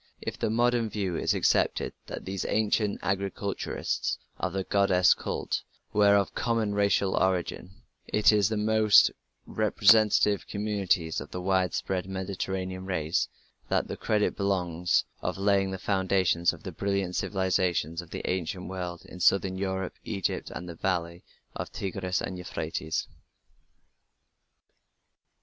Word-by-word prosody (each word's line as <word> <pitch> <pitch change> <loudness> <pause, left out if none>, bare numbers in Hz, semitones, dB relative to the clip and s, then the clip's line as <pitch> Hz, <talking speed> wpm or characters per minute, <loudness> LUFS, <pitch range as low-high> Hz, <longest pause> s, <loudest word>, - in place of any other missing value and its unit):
If - - -6
the - - 0
modern 120 0 +2
view 95 -5 -2
is - - +1
accepted - - +1
that - - -7
these 95 0 -3
ancient 105 -1 +1
agriculturists 100 0 -2 0.2
of - - -1
the 95 0 -2
goddess 95 -2 +4
cult - - -3 0.3
were 105 -1 +5
of 100 -1 +1
common 115 -3 0
racial 100 -1 +2
origin, 90 -1 0 0.4
it 105 - +4
is 105 -3 +3
to 110 - -1
the 105 - -1
most 110 -1 +6 0.3
representative 105 -1 +4
communities 100 -5 0
of - - -9
the 90 - -5
widespread 95 0 0
Mediterranean 95 -1 -4
race 80 -4 0 0.4
that - - +1
the - - -4
credit 105 -1 0
belongs 90 -3 +1 0.2
of - - -2
laying 100 -1 +2
the 95 - -4
foundations 95 -3 +2
of - - -12
the 95 - -5
brilliant 100 0 -1
civilizations 90 -4 0
of 85 - -14
the - - -5
ancient 90 +1 -2
world 90 -2 -5
in 90 - -11
southern 95 +1 +3
Europe, 95 -1 -2
and 110 - -4
Egypt, 95 - -2
and 90 - -7
the 85 - -6
valley 85 0 -2 0.3
of - - -5
the - - -10
Tigris 95 -3 -2
and 90 -1 -4
Euphrates. 80 -2 -3
95 Hz, 140 wpm, -28 LUFS, 90-100 Hz, 0.4 s, most